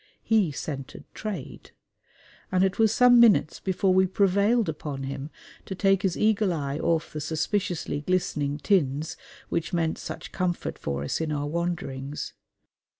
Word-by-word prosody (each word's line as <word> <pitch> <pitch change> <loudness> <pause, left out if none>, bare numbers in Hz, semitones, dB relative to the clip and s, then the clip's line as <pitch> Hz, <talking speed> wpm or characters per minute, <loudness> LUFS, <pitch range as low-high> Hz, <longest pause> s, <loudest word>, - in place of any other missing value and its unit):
He 215 -8 +3
scented 135 0 -6
trade; 200 -11 -7 0.8
and 185 0 +3
it 190 +2 0
was 220 -2 +5
some 245 +1 +6
minutes 220 -9 +5
before 190 0 +1
we 190 0 +4
prevailed 200 +4 +2
upon 150 -3 -4
him 135 +2 -5 0.4
to 190 - -4
take 195 0 +3
his 190 -4 0
eagle 210 -2 +2
eye 145 -3 -2
off 165 0 0
the 150 - -4
suspiciously 165 0 -1
glistening 150 -4 0
tins 155 -4 +1 0.3
which 165 0 -2
meant 165 -2 0
such - - -7
comfort 180 -2 -2
for 70 -1 -3
us 70 - -2
in 160 -1 -2
our 145 -1 -1
wanderings. 150 -4 -3
170 Hz, 150 wpm, -26 LUFS, 145-195 Hz, 0.8 s, some